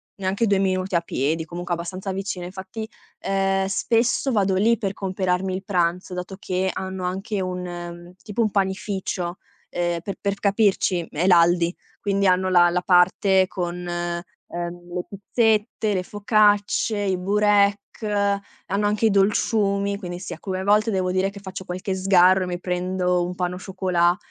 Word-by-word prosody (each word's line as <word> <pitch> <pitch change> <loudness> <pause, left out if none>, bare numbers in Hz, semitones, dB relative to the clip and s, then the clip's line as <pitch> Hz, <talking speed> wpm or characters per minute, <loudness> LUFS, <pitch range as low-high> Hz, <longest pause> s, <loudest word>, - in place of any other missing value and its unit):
neanche 195 +4 0
2 200 -1 +3
minuti 185 -1 0
a - - +5
piedi, 160 +1 -1
comunque 175 +1 -4
abbastanza 185 +3 -5
vicino, 190 -1 -4
infatti, 190 +4 -7 0.3
ehm, 195 0 +1
spesso 230 +6 +1
vado 195 -3 +2
lì 225 +4 +3
per 195 -4 -2
comperarmi 185 -1 -1
il 190 +1 -4
pranzo 180 -1 0
dato 180 +1 -5
che 185 -1 -1
hanno 190 -1 -4
anche 195 +3 -3
un 180 0 -3
mhmm, 175 0 -7
tipo 215 +3 -2
un 215 - +1
panificio. 190 -2 -2 0.3
Ehm, 175 -1 -1
per 195 +3 -5
per 200 -1 0
capirci, 195 -4 +1
è 160 +4 -1
l'Aldi. 170 0 +4 0.3
Quindi 200 -2 +1
hanno 185 +1 +3
la 175 -1 +6
la 180 +1 0
parte 185 +1 +4
con, 175 -2 -4
uhm, 175 0 -5
le 180 0 -3
pizzette, 215 +1 0
le 185 -2 -1
focacce, 205 +1 +2
i 195 -2 0
burek, 200 +2 +2
hanno 200 0 -1
anche 210 +2 +1
i - - +5
dolciumi, 200 0 +2
quindi 175 -3 -6
sì, 180 - -6
alcune 185 +2 -4
volte 210 +2 +3
devo 185 -1 0
dire 190 +1 +1
che 200 0 -10
faccio 190 -1 -7
qualche 185 +2 -4
sgarro 185 0 +5
e - - -4
mi 175 -1 -3
prendo 180 0 0
un 180 +1 -5
pain 180 0 -2
au - - -6
chocolat, 180 -2 +1
190 Hz, 165 wpm, -23 LUFS, 180-200 Hz, 0.3 s, la